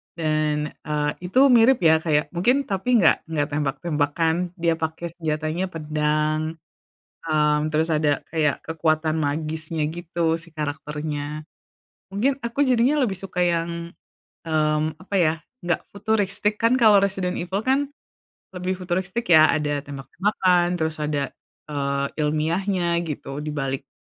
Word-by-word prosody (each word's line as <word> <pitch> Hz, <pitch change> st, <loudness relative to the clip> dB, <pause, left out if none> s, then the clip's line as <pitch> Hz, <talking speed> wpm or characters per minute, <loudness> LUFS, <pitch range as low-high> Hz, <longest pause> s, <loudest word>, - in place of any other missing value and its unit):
Dan, 155 Hz, -2 st, 0 dB
eee, 150 Hz, -1 st, 0 dB
itu 255 Hz, +10 st, +4 dB
mirip 240 Hz, +2 st, +6 dB
ya 160 Hz, 0 st, +6 dB
kayak 150 Hz, -3 st, +1 dB
mungkin 250 Hz, +11 st, +2 dB
tapi 225 Hz, +4 st, +2 dB
nggak 160 Hz, -, +4 dB
nggak 150 Hz, -3 st, -1 dB
tembak-tembakan, 150 Hz, +2 st, 0 dB, 0.2 s
dia 165 Hz, -1 st, +2 dB
pake 160 Hz, +2 st, -3 dB
senjatanya 155 Hz, +3 st, -1 dB
pedang, 155 Hz, 0 st, -1 dB, 0.7 s
eee, 150 Hz, -1 st, +3 dB
terus 160 Hz, +1 st, +1 dB
ada 150 Hz, -2 st, +2 dB
kayak 155 Hz, -4 st, +1 dB
kekuatan 155 Hz, -1 st, 0 dB
magisnya 155 Hz, +2 st, -2 dB
gitu 170 Hz, 0 st, -1 dB
si 170 Hz, -, -15 dB
karakternya. 150 Hz, 0 st, -4 dB, 0.7 s
Mungkin 260 Hz, +7 st, +1 dB
aku 235 Hz, +5 st, 0 dB
jadinya 255 Hz, +3 st, +3 dB
lebih 215 Hz, -8 st, 0 dB
suka 185 Hz, -1 st, -5 dB
yang 170 Hz, 0 st, -2 dB, 0.5 s
mmm, 155 Hz, -1 st, 0 dB
apa 200 Hz, +2 st, -8 dB
ya, 165 Hz, -4 st, +4 dB, 0.3 s
nggak 175 Hz, -, -1 dB
futuristik, 210 Hz, 0 st, -1 dB
kan 230 Hz, +3 st, +4 dB
kalau 215 Hz, -5 st, +6 dB
Resident 190 Hz, -2 st, 0 dB
Evil 190 Hz, +4 st, -3 dB
kan 270 Hz, +2 st, +2 dB, 0.6 s
lebih 180 Hz, 0 st, -3 dB
futuristik, 185 Hz, +5 st, -2 dB
ya, 155 Hz, -1 st, +8 dB
ada 145 Hz, -2 st, 0 dB
tembak-tembakan, 175 Hz, +5 st, 0 dB
terus 160 Hz, -1 st, -2 dB
ada, 145 Hz, -2 st, -1 dB, 0.3 s
eee, 140 Hz, -1 st, -1 dB
ilmiahnya 170 Hz, +3 st, 0 dB
gitu 140 Hz, -1 st, -5 dB
dibalik 135 Hz, -3 st, -3 dB
160 Hz, 125 wpm, -23 LUFS, 150-185 Hz, 0.7 s, ya